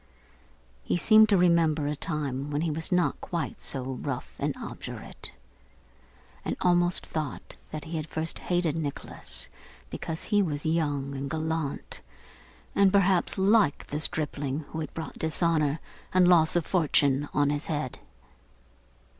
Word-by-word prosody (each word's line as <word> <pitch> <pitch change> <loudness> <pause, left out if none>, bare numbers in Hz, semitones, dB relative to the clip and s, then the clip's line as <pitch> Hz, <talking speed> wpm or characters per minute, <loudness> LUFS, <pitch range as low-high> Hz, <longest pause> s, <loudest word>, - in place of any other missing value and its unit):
He - - 0
seemed 215 +4 +6
to 200 - +5
remember 165 -4 +3
a 150 +1 -1
time 145 -2 -2
when 145 +1 -1
he 165 -1 0
was 160 +4 -1
not 180 -1 +1
quite 170 -2 -4
so 135 -2 -2
rough 130 -1 -4
and - - -1
obdurate; - - -8 1.1
and - - -3
almost 175 0 +2
thought 155 -4 -5 0.2
that 155 - -6
he 165 0 -4
had 155 0 -5
first 160 +1 -2
hated 175 -4 0
Nicholas 150 -4 -1 0.4
because 160 0 -4
he 205 -1 +2
was 150 -6 -2
young 145 -4 0
and 135 +1 -4
gallant, 160 -2 -2 0.7
and 200 -1 +5
perhaps 195 -2 +3
like 195 -5 +3
the 150 - -4
stripling 145 -2 -1
who 160 - -5
had 155 -3 -4
brought 160 -1 -6
dishonour 160 -2 +1 0.4
and 185 -1 +6
loss 170 -3 +5
of 170 -3 +2
fortune 145 -5 +2
on 145 -1 +2
his 145 +1 -2
head. 145 -5 -3
160 Hz, 145 wpm, -28 LUFS, 145-175 Hz, 1.1 s, seemed